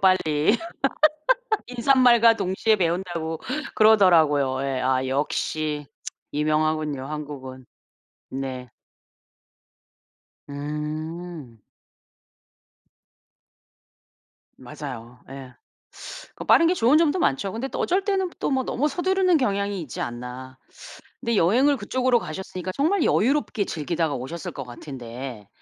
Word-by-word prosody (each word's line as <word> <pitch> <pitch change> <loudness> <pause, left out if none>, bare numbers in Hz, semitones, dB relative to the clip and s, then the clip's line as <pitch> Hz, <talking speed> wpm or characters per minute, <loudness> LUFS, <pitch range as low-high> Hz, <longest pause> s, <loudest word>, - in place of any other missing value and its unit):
빨리. 185 0 +3 1.1
'인사말과 245 -2 +5
동시에 190 +4 +1
배운다.'고 170 -3 -2 0.3
그러더라고요. 160 -11 +4
예. 135 -2 -1
아 130 0 +1
역시 150 +2 -2 0.5
유명하군요 155 -2 0
한국은. 140 -4 -7 0.6
네. 130 -2 -5 1.8
음. 150 -1 -6 3.0
맞아요. 125 -2 -9
예. 135 -2 -9 0.8
그 - - -7
빠른 335 - +6
게 350 - +3
좋은 270 -3 +4
점도 325 +1 +2
많죠. 190 - 0
근데 230 +4 -3
또 - - -5
어쩔 375 +3 +1
때는 385 -2 0
또 - - -1
뭐 265 -1 +1
너무 280 +3 0
서두르는 365 +3 +2
경향이 200 - -1
있지 140 -8 -6
않나. 125 +2 -6 0.6
근데 235 0 0
여행을 255 +12 +4
그쪽으로 250 +3 +1
가셨으니까 185 +1 -6
정말 320 +5 +2
여유롭게 255 -3 +1
즐기다가 160 -1 -2
오셨을 140 +6 -6
것 135 - -5
같은데 125 -3 -8
160 Hz, 235 characters per minute, -24 LUFS, -, 3.0 s, 빠른